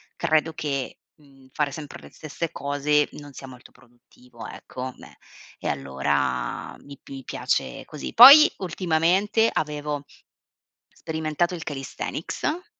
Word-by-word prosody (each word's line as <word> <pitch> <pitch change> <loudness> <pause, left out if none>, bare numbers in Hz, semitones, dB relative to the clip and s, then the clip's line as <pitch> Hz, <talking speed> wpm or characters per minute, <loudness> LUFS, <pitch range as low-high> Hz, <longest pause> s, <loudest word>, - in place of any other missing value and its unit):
credo 160 -1 +1
che, 140 -4 -4 0.2
mhmm, 135 -3 -21
fare 145 +1 -1
sempre 150 0 -8
le - - -13
stesse 160 +1 -6
cose 145 +1 0
non 145 -1 -11
sia 135 - -10
molto 125 -2 -14
produttivo, 120 0 -15
ecco, 130 0 -8
beh. - - -16 0.4
E - - -5
allora 70 +1 -2
mi 140 -1 -13
mi 135 -1 -8
piace - - -2
così. 150 - -8
Poi 280 +6 +11
ultimamente 185 +5 +1
avevo 150 -1 -3 1.0
sperimentato 160 +2 -1
il 165 - -7
calisthenics. 155 - -4
150 Hz, 120 wpm, -24 LUFS, 135-165 Hz, 1.0 s, Poi